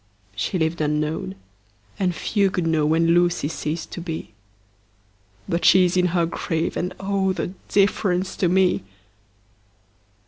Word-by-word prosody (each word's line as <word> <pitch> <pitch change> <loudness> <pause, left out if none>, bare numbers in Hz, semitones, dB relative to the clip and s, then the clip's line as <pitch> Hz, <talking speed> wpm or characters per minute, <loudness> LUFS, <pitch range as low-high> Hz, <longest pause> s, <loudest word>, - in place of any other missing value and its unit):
She 150 - -1
lived 160 0 -1
unknown, 150 -8 -1 0.6
and 180 -3 0
few 200 +1 +1
could 180 -2 -2
know 160 -2 +2
When 165 +2 +2
Lucy 175 -3 +2
ceased 160 +1 -4
to 175 - -6
be; 165 -2 -4
10 - - -25 1.2
But 170 - -1
she 185 -1 +6
is 180 +1 0
in 180 0 +3
her 170 -1 +1
grave, 165 0 -2
and, 180 +1 -3
oh, 195 -1 0
The 180 0 -4 0.2
difference 195 -2 +1
to 180 - +2
me! 185 0 +3
175 Hz, 145 wpm, -23 LUFS, 160-185 Hz, 1.2 s, she